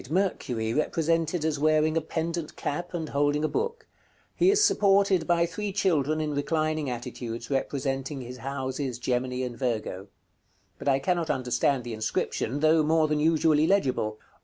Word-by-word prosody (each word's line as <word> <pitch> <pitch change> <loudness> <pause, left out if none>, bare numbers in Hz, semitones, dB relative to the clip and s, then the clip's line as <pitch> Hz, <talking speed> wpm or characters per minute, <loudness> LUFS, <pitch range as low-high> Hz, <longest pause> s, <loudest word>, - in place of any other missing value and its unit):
_ - - -14
Mercury, 130 - -1
represented 165 +2 0
as 155 -3 0
wearing 155 +1 +3
a 165 - +2
pendent 165 +1 -3
cap, 175 +5 -4
and 160 -2 -3
holding 145 +1 +1
a - - +3
book: 460 - -3 0.5
he 360 - +4
is 410 +1 +4
supported 195 - +3
by 170 -1 +3
three 205 +4 -4
children 155 -7 +1
in 155 -1 -1
reclining 155 0 -1
attitudes, 120 0 -6
representing 135 +1 -2
his 125 +1 -8
houses 130 0 -3
Gemini 125 +1 -1
and 125 -1 -4
Virgo. 110 -6 -3 0.7
But - - -7
I 135 -1 +4
cannot 170 +4 -1
understand 125 +1 +1
the 120 -1 -5
inscription, 110 +4 -2
though 155 +1 +5
more 155 +1 +3
than 150 0 0
usually 155 0 +3
legible. 130 - +1
150 Hz, 160 wpm, -27 LUFS, 130-165 Hz, 0.7 s, though